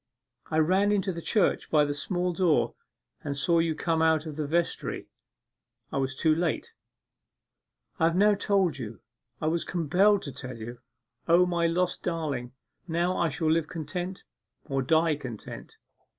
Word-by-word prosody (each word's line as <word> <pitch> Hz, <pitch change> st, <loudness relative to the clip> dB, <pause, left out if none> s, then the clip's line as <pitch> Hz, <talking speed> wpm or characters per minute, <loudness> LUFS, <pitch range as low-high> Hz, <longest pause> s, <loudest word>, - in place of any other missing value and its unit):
I 155 Hz, -, 0 dB
ran 190 Hz, +6 st, +3 dB
into 200 Hz, -1 st, +1 dB
the 170 Hz, -, -6 dB
church 205 Hz, +1 st, +1 dB
by 150 Hz, -2 st, +4 dB
the 145 Hz, -, -1 dB
small 180 Hz, +4 st, -1 dB
door 170 Hz, -3 st, +2 dB, 0.5 s
and 140 Hz, -1 st, -3 dB
saw 170 Hz, +4 st, +3 dB
you 165 Hz, -1 st, +1 dB
come 165 Hz, 0 st, 0 dB
out 160 Hz, -1 st, +3 dB
of 155 Hz, -2 st, -6 dB
the 150 Hz, -1 st, -3 dB
vestry; 170 Hz, +3 st, -1 dB, 0.8 s
I 140 Hz, -, -1 dB
was 135 Hz, 0 st, -1 dB
too 155 Hz, +3 st, +3 dB
late. 175 Hz, -, -1 dB, 1.3 s
I 160 Hz, -, +4 dB
have 165 Hz, +1 st, +2 dB
now 205 Hz, +3 st, +5 dB
told 195 Hz, -7 st, +1 dB
you. 110 Hz, -4 st, -7 dB, 0.4 s
I -, -, -3 dB
was 165 Hz, +2 st, +1 dB
compelled 185 Hz, +5 st, +2 dB
to 140 Hz, -, -5 dB
tell 125 Hz, -2 st, -7 dB
you. 120 Hz, +2 st, -8 dB, 0.5 s
O, 175 Hz, +2 st, +6 dB
my 170 Hz, -1 st, +1 dB
lost 175 Hz, +2 st, 0 dB
darling, 145 Hz, -8 st, -3 dB, 0.3 s
now 175 Hz, +2 st, 0 dB
I 170 Hz, -, +1 dB
shall 155 Hz, +2 st, 0 dB
live 160 Hz, -1 st, +2 dB
content 175 Hz, +3 st, -5 dB, 0.4 s
or 135 Hz, -2 st, -1 dB
die 160 Hz, +3 st, +3 dB
content! 120 Hz, -7 st, -8 dB
165 Hz, 165 wpm, -28 LUFS, 150-180 Hz, 1.3 s, O